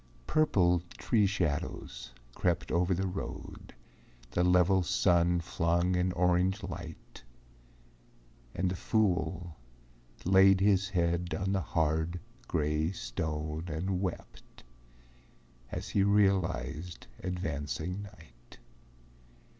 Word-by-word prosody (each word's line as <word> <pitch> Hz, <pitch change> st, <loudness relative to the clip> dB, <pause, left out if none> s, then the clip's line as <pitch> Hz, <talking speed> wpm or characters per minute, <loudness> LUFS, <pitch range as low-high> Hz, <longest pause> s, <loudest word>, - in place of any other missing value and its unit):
Purple 90 Hz, -, +3 dB, 0.2 s
tree 105 Hz, -4 st, +2 dB
shadows 75 Hz, -9 st, -3 dB, 0.2 s
crept 90 Hz, +3 st, -1 dB
over 90 Hz, +2 st, +1 dB
the 95 Hz, +3 st, -1 dB
road, 95 Hz, -8 st, -6 dB, 0.6 s
The 90 Hz, -, +1 dB
level 90 Hz, +1 st, +4 dB
sun 85 Hz, +1 st, +2 dB
flung 85 Hz, +1 st, +1 dB
an 90 Hz, +1 st, +1 dB
orange 90 Hz, +3 st, +2 dB
light, 85 Hz, -3 st, -8 dB, 1.3 s
And 90 Hz, 0 st, 0 dB
the -, -, -2 dB
fool 90 Hz, -5 st, 0 dB, 0.7 s
laid 95 Hz, +1 st, +6 dB
his 100 Hz, -1 st, +3 dB
head 85 Hz, -2 st, 0 dB
on 95 Hz, 0 st, -1 dB
the 95 Hz, -1 st, +1 dB
hard, 80 Hz, +1 st, 0 dB, 0.3 s
gray 75 Hz, +1 st, 0 dB
stone 75 Hz, +3 st, -4 dB
And 90 Hz, +4 st, -2 dB
wept 95 Hz, -3 st, -6 dB, 1.1 s
as -, -, -5 dB
he 100 Hz, -, +2 dB
realized 90 Hz, -6 st, +1 dB, 0.2 s
advancing 90 Hz, +1 st, -3 dB
night. 85 Hz, -, -15 dB
90 Hz, 100 wpm, -31 LUFS, 80-95 Hz, 1.3 s, laid